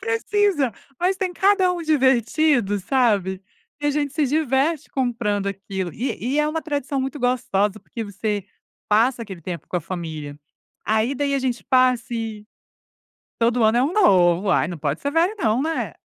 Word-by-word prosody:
Precisa. 410 - +1 0.3
Mas, 370 +2 +2
tem 370 -1 -2
cada 380 -1 +3
um 345 -1 -4
divertido, 265 -5 +2
sabe, 200 -5 +1 0.4
e 290 - -1
a - - +3
gente 290 -1 -1
se 300 -1 +1
diverte 295 +2 0
comprando 210 -6 -1
aquilo, 195 -2 -5
e 250 - -3
e 300 - +1
é 300 - +2
uma 320 +1 -3
tradição 285 -3 -2
muito 270 +3 -4
gostosa, 215 -5 0
porque 230 - -7
você 205 0 -3 0.4
passa 230 +3 +3
aquele 190 -5 -9
tempo 170 +1 -6
com - - -2
a 175 - -1
família. 155 -4 -6 0.5
Aí, 220 +5 +1
daí, 280 +1 0
a 275 - +2
gente 245 -6 -2
passa 255 -2 +2
e 220 -2 -5 0.9
todo 235 0 +2
ano 220 +2 +4
é 250 - +3
um 300 - 0
novo, 190 - +4
ai, - - +2
não 170 -1 -6
pode 145 +1 -2
ser 285 - -2
velho 345 +7 +2
não, 230 - +1
né? 320 +2 -2
245 Hz, 175 wpm, -22 LUFS, 205-295 Hz, 0.9 s, ano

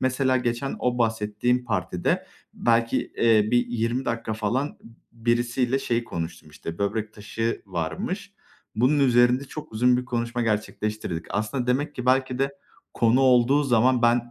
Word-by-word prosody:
Mesela 130 0 +2
geçen 120 +2 -2
o 125 0 0
bahsettiğim 115 +2 0
partide 90 -6 -1 0.3
belki, 115 0 +2 0.2
eee, 110 -2 +4
bir 120 0 +3
20 120 +2 -1
dakika 115 -2 -2
falan 120 +7 -2
b 115 - -14 0.4
birisiyle 120 +2 +1
şey 120 -2 -1
konuştum, 80 -4 -6
işte, 85 +3 -8
böbrek 105 +1 -2
taşı 110 +2 -3
varmış. 85 -4 -4 0.4
Bunun 130 +6 +3
üzerinde 125 0 +4
çok 150 -1 -9
uzun 125 +3 +3
bir 125 - -2
konuşma 120 0 -2
gerçekleştirdik. 105 -5 -2
Aslında 120 +4 -2
demek 140 +4 0
ki, 125 0 -5
belki 130 0 +2
de, 135 0 +1 0.4
konu 120 +3 +3
olduğu 130 +2 +4
zaman 125 0 +3
ben 120 0 +2
120 Hz, 145 wpm, -25 LUFS, 110-125 Hz, 0.4 s, eee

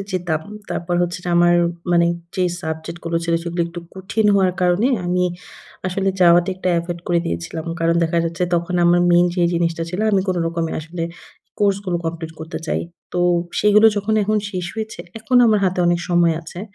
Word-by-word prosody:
যেতাম। 175 -4 -1 0.3
তারপর 175 +1 -2
হচ্ছে 175 0 -2 0.2
আমার 175 0 +5 0.4
মানে 170 0 +4 0.3
যে 185 - +1 0.2
সাবজেক্ট 160 +1 -5
গুলো 165 0 -1
ছিল, 170 0 +1
সেগুলো 170 0 -2
একটু 170 +1 -8
কঠিন 195 +3 -1
হওয়ার 190 -2 +3
কারণে 180 +6 +3 0.2
আমি 180 0 +1 0.6
আসলে 195 +1 -1
যাওয়াতে 175 0 +5
একটা 185 - -2
এভয়েদ 170 0 -4
করে 175 -1 +3
দিয়েছিলাম। 85 - -4 0.2
কারণ 165 0 +2
দেখা 170 +1 +1
যাচ্ছে, 170 +2 -3
তখন 170 +1 -1
আমার 175 +1 +4
মেইন 175 +1 +5
যে 180 - +1
জিনিসটা 165 -1 0
ছিল 185 - -3
আমি 195 - +4
কোন 185 - +1
রকমে 165 -1 -2
আসলে 165 +2 -6 0.6
কোর্স 200 -2 +3
গুলো 180 -2 -1
কমপ্লিট 165 0 -4
করতে 160 - -5
চাই। - - -1 0.3
তো 175 - -1 0.4
সেগুলো 210 +1 +6
যখন 210 +2 0
এখন 215 +2 +1
শেষ 180 -3 -4
হয়েছে, 220 -1 -5 0.2
এখন 225 +3 0
আমার 215 -2 +4
হাতে 185 0 0
অনেক 175 0 +2
সময় 170 -2 +3
আছে। 170 +2 -9
175 Hz, 185 wpm, -20 LUFS, 170-185 Hz, 0.6 s, সেগুলো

